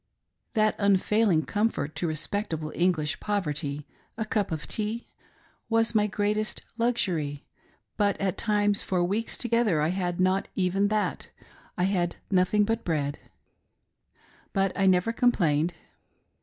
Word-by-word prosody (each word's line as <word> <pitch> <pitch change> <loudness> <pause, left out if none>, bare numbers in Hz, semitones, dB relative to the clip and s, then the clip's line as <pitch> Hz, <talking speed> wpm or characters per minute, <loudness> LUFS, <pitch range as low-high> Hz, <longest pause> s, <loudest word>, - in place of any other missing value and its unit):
That 215 -1 +3
unfailing 200 -3 +3
comfort 205 -9 -1
to 175 - 0
respectablfe 160 0 -3
Eiiglish 170 -4 +1
poverty 150 -8 -2 0.2
— - - -38
a 220 - -1
Cup 210 -4 -1
of 155 -1 -4
tea— 220 +2 -2 0.6
was 225 0 +2
my 210 -1 +3
greatest 210 +1 -1
luxury, 180 -12 -1 0.5
but 205 -2 +1
at 195 -2 0
times 205 -2 +2
far 185 -2 0
wteeks 205 +6 -1
together 230 -8 +2
I 150 +1 +2
had 180 -1 -2
not 185 +1 +2
even 195 +2 +2
that; 210 0 -1 0.5
I 180 - +1
had 180 -3 +1 0.2
no 180 -1 +5
thing 210 +3 +2
but 225 +2 -1
bread 145 -4 -1 0.7
— - - -34
but 195 -1 +2
I 195 -1 +2
never 185 +4 +3
fcOmplained. 170 -11 +2
195 Hz, 140 wpm, -27 LUFS, 170-215 Hz, 0.7 s, no